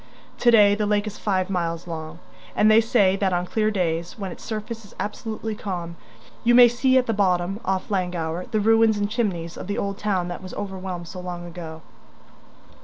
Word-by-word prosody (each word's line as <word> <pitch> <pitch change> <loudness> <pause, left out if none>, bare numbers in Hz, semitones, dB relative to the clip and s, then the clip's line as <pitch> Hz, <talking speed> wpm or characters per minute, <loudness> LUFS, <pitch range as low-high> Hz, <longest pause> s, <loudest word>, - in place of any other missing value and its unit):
To 240 - +4
day 210 -3 +7
the 210 0 0
lake 205 0 +1
is 210 -1 -7
five 190 -3 0
miles 170 -3 -2
long; 160 -1 -6 0.4
and 215 +1 +5
they 220 +1 +7
say 205 -4 +3
that 195 -2 +1
on 175 0 0
clear 215 +3 +1
days, 170 -4 -2
when 195 -3 -5
its - - -10
surface 220 +1 -5
is 205 - -16
absolutely 220 +2 -4
calm, 175 -5 -5 0.5
you 240 +1 +4
may 245 0 +9
see 260 +2 +2
at 255 - +3
the 225 - 0
bottom, 190 -1 +1
off 190 0 -2
Llangower, 180 -1 -2
the 220 -2 0
ruins 225 0 +4
and 205 0 0
chimneys 185 -8 -2
of - - -7
the 205 - -2
old 200 0 -3
town 190 -4 0
that 175 - -6
was 185 - -8
overwhelmed 190 -3 -5
so 185 - -8
long 175 -1 -6
ago. 165 -2 -8
195 Hz, 200 wpm, -24 LUFS, 175-215 Hz, 0.5 s, may